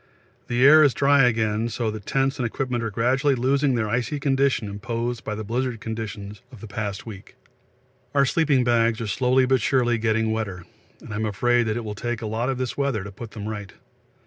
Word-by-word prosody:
The 120 +2 +2
air 155 +2 +8
is 145 -4 +4
dry 140 -1 +4
again, 110 -1 0
so 115 -1 -2
that 105 -2 -9
tents 135 0 0
and 125 - 0
equipment 125 0 -3
are 115 - -1
gradually 130 +6 +1
losing 135 +2 +1
their 110 -2 0
icy 125 +6 -1
condition 135 -4 +1
imposed 115 +3 -4
by 105 - -4
the 110 - -5
blizzard 120 +2 -2
conditions 105 -2 -6
of 125 - -12
the 110 - -9
past 100 0 -4
week. 100 -4 -11 0.8
Our 140 -1 +5
sleeping 145 -3 +2
bags 115 -1 +2
are 115 - -3
slowly 125 +5 +2
but 130 -1 +2
surely 120 -1 +2
getting 110 0 +1
wetter 100 -6 -4 0.4
and 110 - -9
I'm 110 +1 -1
afraid 120 +3 +1
it 110 +1 -2
will 105 - -4
take 120 +2 -4
a - - -3
lot 110 +4 -2
of 135 - -1
this 130 -1 -3
weather 140 -8 -1
to 100 - -8
put 110 +3 -9
them 105 0 -5
right. 105 -3 -6
115 Hz, 205 wpm, -24 LUFS, 110-130 Hz, 0.8 s, air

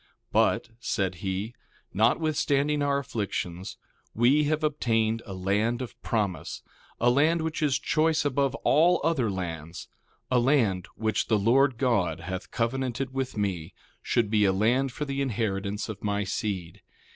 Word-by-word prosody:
1:5 - - -33 0.2
But, - - +2
said 95 -5 -1
he, 95 +5 -2 0.4
notwithstanding 145 - +2
our 140 -1 +2
afflictions, 100 -8 -4 0.4
we 135 +6 +4
have 155 +1 0
obtained 115 -7 +1
a 95 - -6
land 105 +6 0
of 120 -2 -7
promise, 100 -8 -2 0.4
a 120 +1 +4
land 160 +5 +3
which 160 0 -3
is 145 -3 +2
choice 155 0 +1
above 140 -1 +1
all 165 +5 +5
other 145 -8 +1
lands; 85 -3 -5 0.4
a 125 - +4
land 120 - +2
which 110 0 -1
the 110 - +3
Lord 125 +5 +3
God 100 - +1
hath 95 -1 -5
covenanted 130 +2 -2
with 135 -3 -3
me 95 -4 -2 0.3
should 115 -4 0
be 105 -1 +3
a 100 - +4
land 120 +7 +2
for 150 - -4
the 140 -1 -2
inheritance 105 -5 -2
of 110 -3 -7
my 105 0 0
seed. 95 -4 -4
115 Hz, 150 wpm, -27 LUFS, 100-140 Hz, 0.4 s, all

